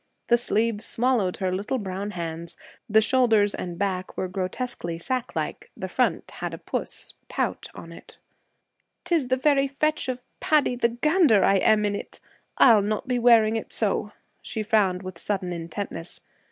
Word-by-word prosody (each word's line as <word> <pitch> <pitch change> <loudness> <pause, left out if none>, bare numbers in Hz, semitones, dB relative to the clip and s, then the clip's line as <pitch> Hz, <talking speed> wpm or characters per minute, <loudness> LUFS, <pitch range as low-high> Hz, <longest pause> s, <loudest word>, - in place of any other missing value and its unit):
The 240 - +6
sleeves 225 -2 0
swallowed 230 -6 0
her 190 -2 -1
little 200 +8 -2
brown 195 -2 -4
hands, 170 -3 -6 0.3
the 220 +1 +5
shoulders 225 -5 +3
and 175 -1 -5
back 185 -1 -2
were 185 - -1
grotesquely 185 -1 -4
sack 250 +8 -3
like, - - -4
the - - -4
front - - 0
had - - -5
a - - -10
puss - - -5 0.2
[pout] - - -2
on - - -10
it. - - -13 0.9
''Tis 335 -7 +1
the 255 +1 +1
very 275 0 +3
fetch 305 +1 -1
of 250 -1 -4 0.2
Paddy 295 -5 +2
the 240 -1 +2
gander 260 - +3
I 195 - +4
am 210 +2 +3
in 205 - 0
it. 205 - -6 0.4
I'll 225 -5 +7
not 215 +6 -2
be 250 -1 0
wearing 230 -2 +5
it 225 - -6
so.' 210 -1 -1 0.3
She 220 - -4
frowned 205 -4 +2
with 185 -2 -8
sudden 185 -3 -2
intentness. 170 +1 -6
215 Hz, 165 wpm, -25 LUFS, 190-250 Hz, 0.9 s, I'll